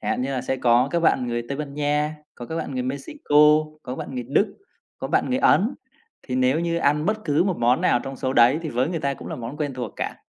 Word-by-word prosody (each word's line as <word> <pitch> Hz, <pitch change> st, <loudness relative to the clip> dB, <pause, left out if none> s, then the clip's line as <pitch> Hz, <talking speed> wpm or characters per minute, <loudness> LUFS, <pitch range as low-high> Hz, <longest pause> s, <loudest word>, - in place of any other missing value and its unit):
chẳng -, -, -3 dB
hạn -, -, -1 dB
như 135 Hz, -, -2 dB
là 130 Hz, -, -1 dB
sẽ 130 Hz, +1 st, -2 dB
có 125 Hz, +1 st, +3 dB
các 170 Hz, -, 0 dB
bạn 130 Hz, -6 st, +2 dB
người 120 Hz, 0 st, -2 dB
Tây 140 Hz, -, -3 dB
Ban 145 Hz, -2 st, -6 dB
Nha, 150 Hz, +1 st, 0 dB, 0.2 s
có 120 Hz, -, -9 dB
các 160 Hz, -, -5 dB
bạn 155 Hz, -3 st, -4 dB
người 125 Hz, -, -1 dB
Mexico, 140 Hz, -, -3 dB, 0.5 s
có 125 Hz, -, -5 dB
bạn -, -, -6 dB
người 125 Hz, -1 st, -4 dB
Đức, 200 Hz, +8 st, +1 dB, 0.4 s
có -, -, -5 dB
bạn -, -, +1 dB
người 255 Hz, -, +1 dB
Ấn, 235 Hz, 0 st, +3 dB, 0.5 s
thì 125 Hz, -, -5 dB
nếu 130 Hz, +4 st, +2 dB
như 170 Hz, 0 st, -1 dB
ăn 150 Hz, +2 st, +1 dB
bất 215 Hz, 0 st, -1 dB
cứ 150 Hz, +3 st, +2 dB
một 190 Hz, -3 st, 0 dB
món 120 Hz, +2 st, +3 dB
nào 120 Hz, -, +2 dB
trong 135 Hz, 0 st, -6 dB
số 130 Hz, +1 st, -2 dB
đấy 125 Hz, +3 st, +5 dB
thì 160 Hz, -, -4 dB
với 130 Hz, +1 st, 0 dB
người 165 Hz, -2 st, -3 dB
ta 140 Hz, -1 st, -1 dB
cũng -, -, -10 dB
là -, -, -5 dB
món 120 Hz, +4 st, -7 dB
quen 145 Hz, -3 st, -3 dB
thuộc 120 Hz, -5 st, -5 dB
cả. -, -, -4 dB
140 Hz, 275 wpm, -23 LUFS, 125-155 Hz, 0.5 s, đấy